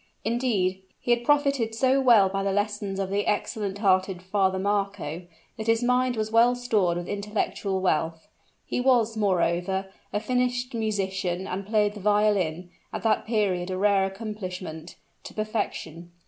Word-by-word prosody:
Indeed, 215 -6 0 0.2
he 245 - -1
had 240 0 +2
profited 280 -5 +2
so 260 +3 +3
well 230 -7 +6
by 195 +1 -2
the 195 0 0
lessons 205 -1 -1
of 195 -1 -2
the 205 +1 0
excellent 205 -1 -1
hearted 185 -2 +1
Father 190 0 +1
Marco, 195 -4 -2 0.3
that 220 0 -5
his 225 +1 +3
mind 250 0 +2
was 220 0 -2
well 235 +2 +5
stored 215 -8 +1
with 175 0 -5
intellectual 205 -1 -2
wealth. 165 -2 0 0.4
He - - -2
was, 240 -4 +3
moreover, 190 -1 0 0.2
a 205 - 0
finished 250 +2 -1
musician, 190 -5 -2
and 195 +1 -5
played 210 -1 +2
the 210 - -9
violin, 195 -4 +1 0.2
at - - -5
that 220 -1 +1
period 195 -5 0
a 185 - -2
rare 200 0 +3
accomplishment, 185 -5 -6 0.3
to - - -10
perfection. 190 -6 -4
205 Hz, 155 wpm, -26 LUFS, 190-225 Hz, 0.4 s, well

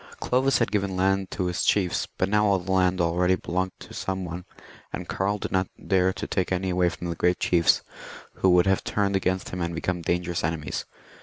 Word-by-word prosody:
Clovis 130 +2 +2
had 115 - 0
given 100 -2 0
land 95 +1 +1
to 90 - -2
his 90 0 -1
chiefs, 95 -4 +1
but 95 - +1
now 105 +1 +3
all 100 -1 +4
the 95 +1 -5
land 90 -1 +2
already 90 +2 +2
belonged 95 +1 -2
to - - -12
some 95 -1 -3
one, 85 +1 -6 0.5
and - - -5
Karl 100 +2 -1
did - - -5
not 95 -1 +1 0.2
dare 95 -1 +3
to 105 +2 -5
take 95 -3 -1
any 95 0 0
away 90 0 +2
from 85 0 -6
the - - -4
great 90 +1 +2
chiefs, 85 -2 +3 0.5
who 95 - +3
would 90 -1 +5
have 95 -1 +2
turned 100 -1 0
against 95 -1 0
him 90 - -5
and 85 0 -2
become 90 +1 -2
dangerous 85 0 -1
enemies. 80 -1 -2
95 Hz, 215 wpm, -26 LUFS, 90-95 Hz, 0.5 s, would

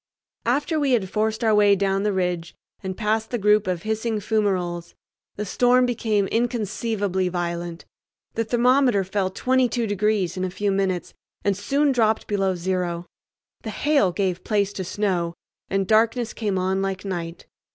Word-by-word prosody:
After 290 +6 +1
we 280 -3 +2
had 195 -6 +1
forced 220 +2 0
our 220 -1 +4
way 205 -1 +5
down 195 0 0
the 210 +1 +1
ridge 180 -3 -2 0.3
and 190 -1 -5
past 220 0 0
the 240 - -1
group 210 -1 +3
of 180 -2 -2
hissing 220 0 -1
fumaroles, 185 -5 -1 0.4
the 210 - -3
storm 250 +5 +3
became 220 -4 0
inconceivably 215 -5 -1
violent. 170 -1 -4 0.5
The 230 - 0
thermometer 245 -1 +3
fell 190 0 -1
22 250 +3 +1
degrees 205 -3 0
in 185 - -1
a 185 - -1
few 200 +2 -1
minutes, 190 -2 -1 0.3
and 200 -1 +2
soon 275 +9 +1
dropped 220 -4 +2
below 195 -2 0
zero. 175 -1 -2 0.6
The - - -6
hail 285 -11 +2
gave 185 -1 -1
place 205 -2 0
to 190 - -4
snow, 180 -3 -1 0.3
and 195 0 0
darkness 225 +3 +2
came 205 -4 -1
on 190 +1 0
like 195 0 -3
night. 170 -3 -5
205 Hz, 160 wpm, -23 LUFS, 185-225 Hz, 0.6 s, way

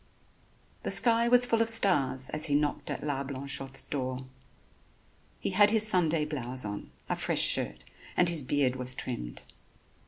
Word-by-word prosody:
The - - -4
sky 235 -1 +3
was 245 +1 +6
full 230 -2 +1
of 230 - +2
stars 135 - +2
as 155 0 -1
he 145 - 0
knocked 145 0 -1
at - - -5
La 140 -2 -2
Blanchotte's 135 0 -3
door. 130 -2 -4 1.1
He - - -3
had 205 +2 +5
his 220 0 +3
Sunday 165 -6 +2
blouse 130 -5 -3
on, 105 0 -6 0.2
a - - -1
fresh - - 0
shirt, 60 +1 +1 0.3
and 180 - +4
his 170 -3 +2
beard 130 -1 0
was 125 0 -2
trimmed. 90 - -6
145 Hz, 160 wpm, -28 LUFS, 130-185 Hz, 1.1 s, was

